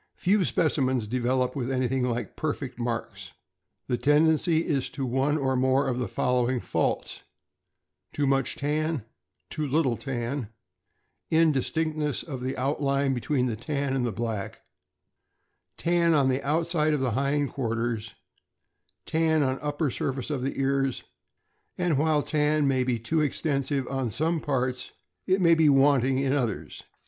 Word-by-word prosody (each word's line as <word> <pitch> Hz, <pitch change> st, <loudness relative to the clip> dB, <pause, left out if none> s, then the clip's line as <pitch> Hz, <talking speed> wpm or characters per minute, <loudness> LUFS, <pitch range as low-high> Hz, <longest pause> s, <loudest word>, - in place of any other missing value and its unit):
Few 195 Hz, +2 st, +2 dB
specimens 130 Hz, -3 st, +1 dB
develop 125 Hz, +2 st, 0 dB
with 130 Hz, -2 st, -2 dB
anything 130 Hz, 0 st, 0 dB
like 120 Hz, 0 st, -4 dB
perfect 145 Hz, -5 st, -4 dB
marks. 120 Hz, -1 st, -4 dB, 0.5 s
The 125 Hz, -, -1 dB
tendency 160 Hz, +2 st, +3 dB
is 140 Hz, -4 st, 0 dB
to 135 Hz, -, -4 dB
one 135 Hz, +4 st, +1 dB
or 135 Hz, -2 st, 0 dB
more 130 Hz, +2 st, +2 dB
of 125 Hz, -1 st, -1 dB
the 125 Hz, -, -1 dB
following 125 Hz, 0 st, 0 dB
faults: -, -, -2 dB, 0.9 s
Too 145 Hz, -, -1 dB
much 135 Hz, -1 st, +1 dB
tan, 150 Hz, -3 st, -1 dB, 0.5 s
too 155 Hz, -2 st, -2 dB
little 140 Hz, -3 st, +1 dB
tan, 120 Hz, -1 st, -4 dB, 0.8 s
indistinctness 155 Hz, -1 st, +1 dB
of 130 Hz, -6 st, -6 dB
outline 140 Hz, 0 st, 0 dB
between 130 Hz, +1 st, 0 dB
the 120 Hz, -3 st, -1 dB
tan 140 Hz, +2 st, -2 dB
and 130 Hz, -, 0 dB
the 120 Hz, -, 0 dB
black, 110 Hz, -2 st, -4 dB, 1.2 s
tan 170 Hz, -1 st, +2 dB
on 135 Hz, -3 st, +3 dB
the 130 Hz, +1 st, 0 dB
outside 155 Hz, +1 st, +1 dB
of -, -, -1 dB
the 130 Hz, -2 st, 0 dB
hind 140 Hz, +3 st, 0 dB
quarters, 115 Hz, -3 st, -2 dB, 0.9 s
tan 160 Hz, -1 st, +2 dB
on 130 Hz, 0 st, -1 dB
upper 145 Hz, -1 st, -1 dB
sur 135 Hz, -, -2 dB
face 130 Hz, +3 st, -5 dB
of 140 Hz, -4 st, -2 dB
the 135 Hz, +2 st, -3 dB
ears; 135 Hz, -1 st, 0 dB, 0.7 s
and 175 Hz, -6 st, +1 dB
while 155 Hz, -1 st, +2 dB
tan 150 Hz, -1 st, +1 dB
may 130 Hz, -2 st, +2 dB
be 125 Hz, -2 st, 0 dB
too 155 Hz, +8 st, 0 dB
extensive 140 Hz, -2 st, -1 dB
on 135 Hz, -3 st, -2 dB
some 160 Hz, +8 st, 0 dB
parts, 130 Hz, -3 st, -2 dB, 0.3 s
it 190 Hz, +1 st, +3 dB
may 170 Hz, -1 st, +6 dB
be 160 Hz, -2 st, +4 dB
wanting 135 Hz, -2 st, +4 dB
in 135 Hz, 0 st, +1 dB
others. 120 Hz, -8 st, -2 dB
135 Hz, 145 wpm, -27 LUFS, 125-150 Hz, 1.2 s, may